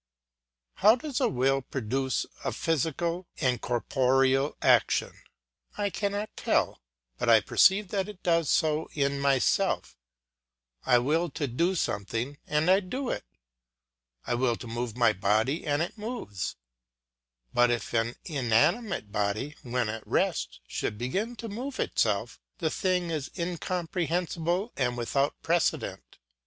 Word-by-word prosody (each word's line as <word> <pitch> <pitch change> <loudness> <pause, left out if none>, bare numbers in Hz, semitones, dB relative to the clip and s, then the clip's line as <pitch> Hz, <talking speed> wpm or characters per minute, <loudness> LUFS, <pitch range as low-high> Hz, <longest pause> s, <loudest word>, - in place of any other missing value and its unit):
How 215 +3 +6
does 280 0 -4
a 250 - +3
will 135 +2 +2
produce 130 +1 -2 0.2
a - - -1
physical 165 +3 -1
and 125 -4 +1
corporeal 135 +3 +2
action? - - +3 0.6
I 205 -1 0
cannot 205 +2 -2
tell, - - 0 0.4
but - - 0
I - - +8
perceive 195 +2 +4
that 195 0 -1
it 205 -3 -11
does 170 -3 +2
so 155 0 +2
in 140 -1 +1
myself; 140 -2 +1 0.9
I 125 - +6
will 155 +8 +1
to 145 +1 -3
do 170 +9 0
something 115 - -2
and 150 +4 +2
I 190 - +6
do 245 +7 -3
it; - - -3 1.0
I - - -1
will 120 -1 +1
to 120 - -9
move 120 0 -4
my 115 -3 +4
body 110 - +1
and 145 +2 +2
it 180 - -7
moves, 215 - -4 1.0
but 120 0 +4
if 120 -3 -2
an 115 +1 +1
inanimate 145 - +1
body, 105 +8 -1
when 125 -1 -1
at 110 0 -5
rest, - - 0
should 105 - -3
begin 195 - -2
to 230 - -7
move 250 +6 -5
itself, 110 +1 0 0.2
the 160 -2 -1
thing 180 -2 0
is 150 -4 -3
incomprehensible 175 +2 -1
and 125 -2 0
without 135 +4 0
precedent. 170 +1 -1
145 Hz, 135 wpm, -28 LUFS, 120-180 Hz, 1.0 s, I